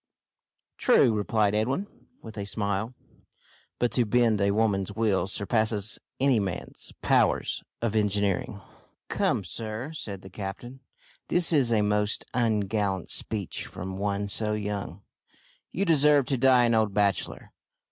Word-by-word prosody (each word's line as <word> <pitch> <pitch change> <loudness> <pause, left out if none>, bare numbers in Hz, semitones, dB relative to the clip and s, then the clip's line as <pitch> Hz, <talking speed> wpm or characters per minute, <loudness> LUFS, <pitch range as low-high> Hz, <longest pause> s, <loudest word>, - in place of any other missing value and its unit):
"True," 115 - +4
replied 105 0 +1
Edwin, 130 - 0 0.4
with 110 -1 -9
a 100 - -4
smile, 100 +3 -2 0.8
"but 120 - 0
to 125 - +3
bend 115 -2 +2
a 100 - +3
woman's 100 -2 +1
will 100 -4 +1
surpasses 110 +1 0 0.2
any 135 -3 +3
man's 95 -4 -5
powers - - +2 0.2
of 115 -2 0
engineering!" 100 -1 0 0.5
"Come, - - 0
sir," 110 - -5
said 100 -11 -7
the 95 - -10
captain, 105 +7 -7 0.5
"that 175 -1 +4
is 135 -6 +3
a 110 -2 +3
most 105 +1 0
ungallant 105 -5 0
speech 105 -5 -3
from 95 +1 -7
one 100 +1 -2
so 105 +1 0
young. 100 -3 -4 0.7
You 195 - -1
deserve 150 -4 +4
to 135 - +2
die 130 0 +5
an 120 - +2
old 110 -3 +1
bachelor. 100 -2 0
105 Hz, 135 wpm, -27 LUFS, 100-120 Hz, 0.8 s, die